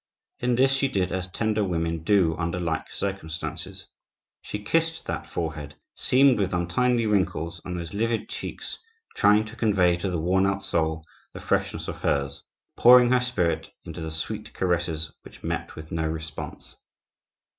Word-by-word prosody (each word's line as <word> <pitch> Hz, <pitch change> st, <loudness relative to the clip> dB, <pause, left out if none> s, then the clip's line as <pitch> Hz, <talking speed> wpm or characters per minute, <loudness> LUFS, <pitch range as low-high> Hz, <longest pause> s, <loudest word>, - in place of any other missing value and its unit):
In 120 Hz, 0 st, +1 dB
this 135 Hz, +2 st, +4 dB
she 135 Hz, 0 st, +2 dB
did 95 Hz, -8 st, 0 dB
as 95 Hz, 0 st, -2 dB
tender 110 Hz, +2 st, 0 dB
women 85 Hz, -3 st, -1 dB
do 85 Hz, -2 st, +3 dB
under 85 Hz, +1 st, -2 dB
like 80 Hz, -3 st, -2 dB
circumstances. 85 Hz, -5 st, -4 dB, 0.6 s
She -, -, -5 dB
kissed 165 Hz, +6 st, 0 dB
that -, -, -4 dB
forehead, 75 Hz, -3 st, -4 dB, 0.2 s
seamed 130 Hz, -2 st, +4 dB
with 95 Hz, -2 st, 0 dB
untimely 115 Hz, +7 st, +1 dB
wrinkles, 85 Hz, -5 st, 0 dB
and 90 Hz, -1 st, -4 dB
those 85 Hz, +1 st, -6 dB
livid 115 Hz, +2 st, 0 dB
cheeks, -, -, -5 dB, 0.4 s
trying 105 Hz, +1 st, +5 dB
to 110 Hz, +1 st, -10 dB
convey 95 Hz, -7 st, +3 dB
to 95 Hz, +2 st, -2 dB
the 90 Hz, -, -1 dB
worn 95 Hz, +4 st, +2 dB
out 95 Hz, 0 st, -1 dB
soul 80 Hz, -1 st, 0 dB, 0.3 s
the -, -, -7 dB
freshness -, -, -1 dB
of -, -, -4 dB
hers,—pouring 120 Hz, -, +3 dB
her 125 Hz, -1 st, +4 dB
spirit 125 Hz, -10 st, 0 dB
into -, -, -7 dB
the 80 Hz, -, -3 dB
sweet 80 Hz, 0 st, -4 dB
caresses 85 Hz, -3 st, 0 dB
which -, -, -15 dB
met -, -, -3 dB
with 80 Hz, 0 st, -10 dB
no 80 Hz, -1 st, 0 dB
response. 80 Hz, -1 st, -6 dB
90 Hz, 155 wpm, -26 LUFS, 80-110 Hz, 0.6 s, trying